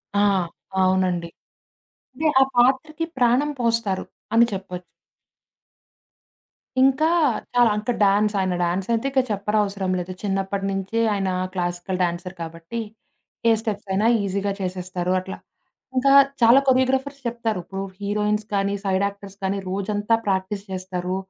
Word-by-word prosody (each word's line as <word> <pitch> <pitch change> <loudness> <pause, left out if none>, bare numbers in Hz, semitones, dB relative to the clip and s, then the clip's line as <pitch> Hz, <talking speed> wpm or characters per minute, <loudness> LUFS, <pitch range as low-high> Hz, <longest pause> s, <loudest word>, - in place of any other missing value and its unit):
ఆ! 200 - +3 0.6
అవునండి. 185 -2 +1 0.8
అంటే 310 +5 -1
ఆ - - +9
పాత్రకి 265 +6 +2
ప్రాణం 250 +4 +3
పోస్తారు 230 -5 0 0.3
అని 230 +1 +6
చెప్పొచ్చు. 185 -2 -6 2.0
ఇంకా 270 +4 +4 0.5
చాలా 245 -1 +5
అంకా 215 +3 -1
డాన్స్. 205 +1 +3
ఆయన 185 -1 0
డాన్సైయితే 195 +7 0
ఇంక 270 - +2
చెప్పరవసరం 200 -2 0
లేదు. 180 +1 -5
చిన్నప్పటి 195 0 -1
నుంచి 195 +3 -3 0.2
ఆయన 195 -2 -1 0.2
క్లాసికల్ 175 +1 -3
డాన్సర్ 180 +1 -3
కాబట్టి 165 +7 -6 0.7
ఏ - - +6
స్టెప్సైనా 205 -2 -2 0.2
ఈజీగా 200 +1 -1
చేసేస్తారు 180 -1 -3
అట్లా. 190 +1 -7 0.6
ఇంకా 275 +2 +4 0.3
చాలా 235 +3 +7
కొరియోగ్రాఫర్స్ 265 +2 +2
చెప్తారు. 230 -4 -2
ఇప్పుడూ 195 +2 -5 0.2
హీరోయిన్స్ 210 +1 -1
కానీ, 200 0 +1
సైడ్ 190 +1 +2
యాక్టర్స్ 200 0 -10
కానీ 195 +1 0
రోజంతా 205 +3 0
ప్రాక్టీస్ 195 +1 -1
చేస్తారు. 185 -1 -3
200 Hz, 120 wpm, -23 LUFS, 185-230 Hz, 2.0 s, ఆ